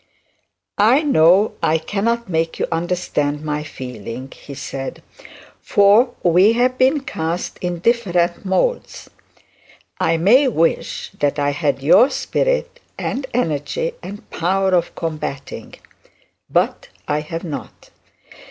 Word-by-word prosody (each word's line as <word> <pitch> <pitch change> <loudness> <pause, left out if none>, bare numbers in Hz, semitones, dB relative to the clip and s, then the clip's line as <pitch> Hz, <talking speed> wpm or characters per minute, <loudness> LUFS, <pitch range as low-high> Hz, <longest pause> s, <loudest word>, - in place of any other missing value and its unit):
'I 245 +9 +5
know 190 - +4
I 160 +1 +2
cannot 215 +8 -1
make 165 -2 -1
you - - 0
understand 165 -4 -1
my 150 -1 -2
feeling,' 125 -2 -8
he 140 - -11
said, 135 0 -6 0.6
'for 215 +5 +4
we 180 +5 +5
have 250 +2 +1
been 270 +3 +3
cast 165 -8 -4
in 175 -1 -3
different 175 -4 +1
moulds. 200 - -1 0.9
I 165 0 +2
may 235 - +5
wish 165 -9 -1
that 145 0 +1
I 145 0 +1
had 145 -2 -1
your 235 - +6
spirit - - -1 0.2
and 265 0 -3
energy 235 - -1
and 205 +1 -9
power 190 +3 0
of 175 -1 +1
combatting; 155 -4 -5 0.7
but - - 0 0.2
I 150 0 0
have 165 +2 -6
not. 155 -5 -8
175 Hz, 120 wpm, -19 LUFS, 150-230 Hz, 0.9 s, your